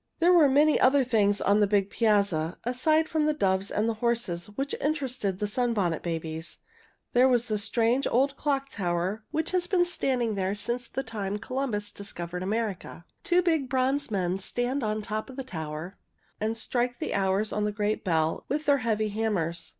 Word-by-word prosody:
There 350 +2 +4
were 320 -5 +6
many 295 +3 +4
other 270 +1 +5
things 210 -5 +2
on 200 +2 +3
the 205 - +4
big 200 -1 +1
piazza, 200 -7 +1
aside 310 +6 +2
from 310 -1 +1
the 305 - +1
doves 190 -6 +1
and 215 +2 0
the 230 - +1
horses, 235 -8 0
which 270 +7 -3
interested 260 -10 -1
the 210 - -1
Sunbonnet 205 -6 0
Babies. 165 -1 -4 0.6
There 250 +2 +6
was 245 -2 +1
a 210 - +1
strange 230 +4 +1
old 275 +3 +2
Clock 275 -2 -1
Tower 185 +2 -2
which 315 - -2
has 360 -1 0
been 355 -2 +3
standing 255 -9 0
there 195 0 -1
since 235 +4 -3
the 270 - -4
time 210 -4 -3
Columbus 230 -3 -3
discovered 180 -3 -6
America. 200 -4 -3 0.2
Two 360 -2 +3
big 320 -7 +1
bronze 265 +2 +1
men 185 -3 -1
stand 245 +7 -2
on 215 -1 -2
top 215 +4 -4
of 260 - -9
the 270 - -4
tower 160 -3 -6 0.4
and 220 +2 -1
strike 245 +2 -1
the - - -3
hours 195 +2 +1
on 210 0 0
a - - -1
great 210 +1 -1
bell 160 -3 0
with 300 +2 -1
their 285 -1 +4
heavy 220 -2 0
hammers. 200 -6 -2
220 Hz, 185 wpm, -27 LUFS, 195-265 Hz, 0.6 s, were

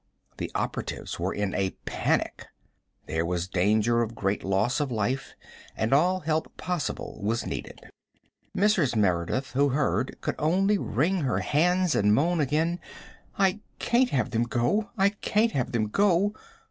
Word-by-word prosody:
The - - -4
operatives - - -3
were - - -1
in 100 -2 -2
a 95 -1 -1
panic. - - -1 0.6
There 80 +1 -1
was 90 +1 -2
danger 105 +5 +2
of 115 0 -3
great 100 0 -1
loss 95 +8 +1
of 145 -3 -1
life, 125 +5 -2 0.4
and 110 +4 +1
all 180 +6 +3
help 155 +1 -2
possible 180 -2 -3
was 110 +3 -1
needed. - - -6 0.8
Mrs. 185 - +3
Merideth, 105 +7 0
who 140 +2 +2
heard, 135 -1 0
could - - -2
only 195 +6 +2
wring 165 - 0
her 135 -3 0
hands 180 +3 +2
and 105 +1 +3
moan 170 +6 +2
again: 155 +5 +1 0.6
"I 195 +1 +2 0.2
can't 245 +1 +2
have 125 -5 0
them 115 0 +1
go 130 - 0
I 195 0 +4
can't 210 +2 +1
have 130 -3 -1
them 115 -3 +1
go!" 200 - +2
135 Hz, 150 wpm, -27 LUFS, 110-180 Hz, 0.8 s, I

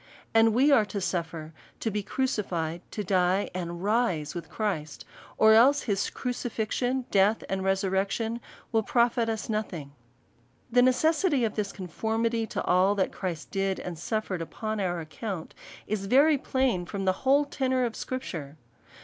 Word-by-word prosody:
And 225 -1 +5
we 275 +4 +5
are 245 -6 +6
to 205 - -4
suffer, 165 -4 -3 0.3
to 225 - -1
be 210 +1 -1
crucified, 180 -9 -2
to 210 - -4
die, 185 0 +1
and 175 -1 -5
rise 200 -9 +1
with 170 -2 -7
Christ; 165 -9 -3 0.3
or 220 0 +7
else 270 +6 +6
his 200 -3 0
crucifixion^ 245 +1 -2
death, 200 +2 +3
and 190 0 -2
resurrection, 195 +4 0 0.3
will 225 -2 +3
profit 235 +1 +2
us 220 -1 -3
nothing. 190 -10 -3 0.8
The 245 +1 +5
necessity 290 +2 +3
of 215 - -2
this 205 -2 -2
conformity 225 +5 -1
to 215 -3 -3
all 185 +3 +3
that 190 -2 0
Christ 175 -4 -5
did, 195 -1 -1
and 180 - -5
suffered 190 +1 -3
upon 215 +6 -4
our 175 -3 -1
account, 160 +3 -6 0.3
is 200 -2 -3
very 280 +5 +5
plain 260 - 0
from 195 0 -4
the 185 - +3
whole 275 +2 +4
tenor 260 -3 0
of 230 - -4
Scripture. 160 - -5
210 Hz, 155 wpm, -28 LUFS, 185-235 Hz, 0.8 s, or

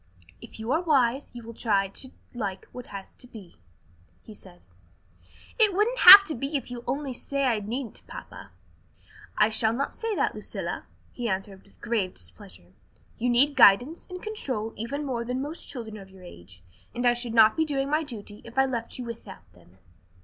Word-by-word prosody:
"If - - -12
you 220 +3 -4
are 315 +4 +2
wise, 275 -5 +1
you 240 - -8
will 230 +1 -9
try 200 -4 +1
to 260 +6 -5 0.2
like 200 -6 -5
what 250 -1 -9
has 200 -1 -9
to 250 - -6
be," 210 -8 -13 0.7
he 220 - -12
said. 185 -3 -15 1.0
"It 420 -4 +5
wouldn't 455 +5 +1
have 395 +2 +12
to 325 - -3
be 275 +4 -2
if 250 -2 -8
you 245 - -5
would 240 - -12
only 275 -2 -3
say 275 +3 -2
I 235 -4 +1
needn't, 230 +4 -6
papa." - - -10 0.9
"I 210 - +4
shall 220 0 +2
not 275 +4 -2
say 450 -2 -3
that, - - 0
Lucilla," - - -6 0.2
he 240 -2 -4
answered 190 0 -4
with 200 - -25
grave 210 -5 -1
displeasure. 90 0 -10 0.5
"You 245 +2 0
need 275 +4 +4
guidance 245 - +5
and 365 0 -8
control 255 - -4
even 280 +7 -4
more 245 -4 -2
than 250 +2 -3
most 295 +5 -6
children 225 -5 -7
of 195 -2 -12
your 190 -1 -16
age, 90 - -14 0.3
and 245 +1 -2
I 240 - +5
should 240 -1 -4
not 220 -1 +6
be 320 - +2
doing 275 -3 -1
my 305 +2 +1
duty 220 -8 -8
if 235 +2 -13
I 270 - +5
left 235 -3 -4
you 250 - -6
without 215 - -10
them." 90 +1 -22
235 Hz, 195 wpm, -26 LUFS, 205-275 Hz, 1.0 s, have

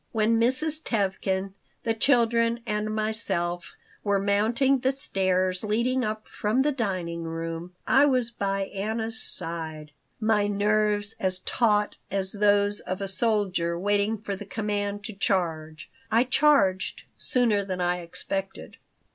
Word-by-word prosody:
When 225 0 +2
Mrs. 300 +6 +2
Tevkin, 195 -3 -1 0.3
the 225 - +1
children, 235 -1 +2
and 210 -1 -1
myself 190 -6 -2 0.3
were 200 -1 +2
mounting 220 +7 +2
the 260 +2 +2
stairs 185 -6 +1
leading 235 +5 +1
up 215 0 -3
from 220 +6 0
the 295 - +2
dining 185 -9 -2
room, 165 +2 -5
I 280 +2 +5
was 250 -4 +1
by 195 -3 -1
Anna's 220 +4 -2
side, 160 -3 -5 0.3
my 215 -2 +2
nerves 205 0 +1
as 185 -1 +1
taut 210 -3 +1
as 190 -1 -1
those 205 0 +3
of 185 +1 -5
a 195 - -3
soldier 190 -4 0
waiting 205 +3 +1
for 205 -1 -4
the 200 - -8
command 205 0 -3
to 220 - -6
charge. 160 -5 -1 0.2
I 230 +2 +4
charged 250 -9 +2
sooner 230 -5 +1
than 185 -2 -4
I 180 0 +1
expected. 195 +3 -5
205 Hz, 135 wpm, -26 LUFS, 190-225 Hz, 0.3 s, I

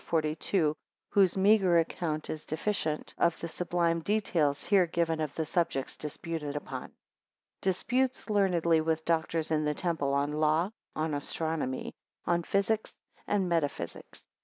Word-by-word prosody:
42, 155 0 +1 0.4
whose 195 -2 +4
meagre 190 -3 +5
account 160 -2 -1
is 155 - -5
deficient 155 -2 -2
of 170 -1 +2
the 170 - -4
sublime 170 0 0
details 165 -7 +1
here 190 -4 +4
given 165 -1 0
of 150 -2 -3
the 160 - -1
subjects 155 -5 -1
disputed 150 -1 -5
upon.] 135 -3 -4
1 - - -14 0.7
Disputes 250 +8 0
learnedly 175 -6 +3
with 160 0 +1
the 160 - -25
doctors 165 -1 0
in 155 -1 +2
the 150 0 0
temple, 165 -5 -1
7 140 - +3
on 145 +1 -1
law, 155 +2 +3 0.3
9 155 - 0
on 160 - -2
astronomy, 145 -2 -2 0.3
12 175 - +1
on 170 - +1
physics 200 +5 0 0.3
and 195 -3 +1
metaphysics. 145 - -3
165 Hz, 155 wpm, -30 LUFS, 155-180 Hz, 0.7 s, meagre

